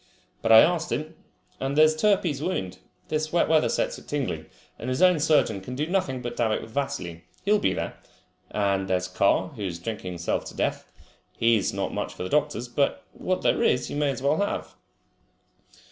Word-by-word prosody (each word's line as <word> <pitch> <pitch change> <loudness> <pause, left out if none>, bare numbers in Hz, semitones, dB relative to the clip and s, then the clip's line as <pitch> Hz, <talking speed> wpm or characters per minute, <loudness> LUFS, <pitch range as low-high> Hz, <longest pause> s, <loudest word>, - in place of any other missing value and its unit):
But - - +1
I 110 - +11
asked 170 -2 +1
him. 155 +2 -3 0.5
And 135 +2 -2
there's 155 0 +6
Turpey's 170 -5 +2
wound! 150 - -3 0.3
This 155 0 -1
wet 170 - +3
weather 160 -1 +3
sets - - -1
it - - -18
tingling, 115 - -3 0.3
and 125 - -4
his 130 - -1
own 180 -3 +5
surgeon 140 -10 +2
can 125 +7 -7
do 145 +3 -1
nothing 155 -8 -1
but 120 0 -4
dab 115 -2 +1
it - - -1
with 110 - -11
vaseline. 125 -11 -3 0.2
He'll 210 +1 +4
be 95 - +2
there. - - -4 0.5
And 100 -2 0
there's 90 -1 0
Carr, 100 - +2
who 130 -9 -11
is 90 -4 -3
drinking 90 0 -5
himself 85 0 -2
to - - -9
death. - - -2 0.5
He 115 0 +4
has 100 - 0
not - - -3
much - - -3
for - - -5
the 90 - -4
doctors, 150 -4 0
but 140 +3 0
what 185 0 -2
there - - +2
is 125 - +1
you - - -4
may 145 -1 +1
as 130 -1 -4
well 140 +3 +3
have." 205 - -2
135 Hz, 205 wpm, -26 LUFS, 105-155 Hz, 0.5 s, I